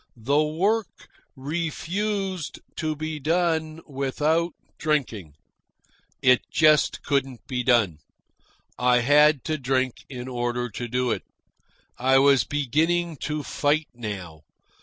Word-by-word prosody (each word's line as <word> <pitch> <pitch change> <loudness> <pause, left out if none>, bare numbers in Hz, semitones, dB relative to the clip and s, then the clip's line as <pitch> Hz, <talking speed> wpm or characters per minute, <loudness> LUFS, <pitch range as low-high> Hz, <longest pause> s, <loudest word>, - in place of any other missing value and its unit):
The 140 +7 +2
work 195 +8 -1 0.3
refused 175 +5 -3 0.2
to 155 -1 -1
be 155 0 -4
done 160 0 0
without 150 +4 0 0.3
drinking. 120 - -1 0.9
It 125 -2 +5
just 155 -1 +3
couldn't 135 -3 -1
be 125 -2 -2
done. 115 - +2 0.8
I 125 -1 +4
had 150 +2 +5
to 155 -1 -2
drink 130 -1 -1
in 125 -2 -7
order 120 -1 -2
to 120 +3 -5
do 125 +1 0
it. - - -1 0.8
I 130 +2 +4
was 135 -4 +5
beginning 160 +5 0
to 150 +1 -3
fight 150 +2 0
now. 95 -9 -7
145 Hz, 115 wpm, -25 LUFS, 125-155 Hz, 0.9 s, It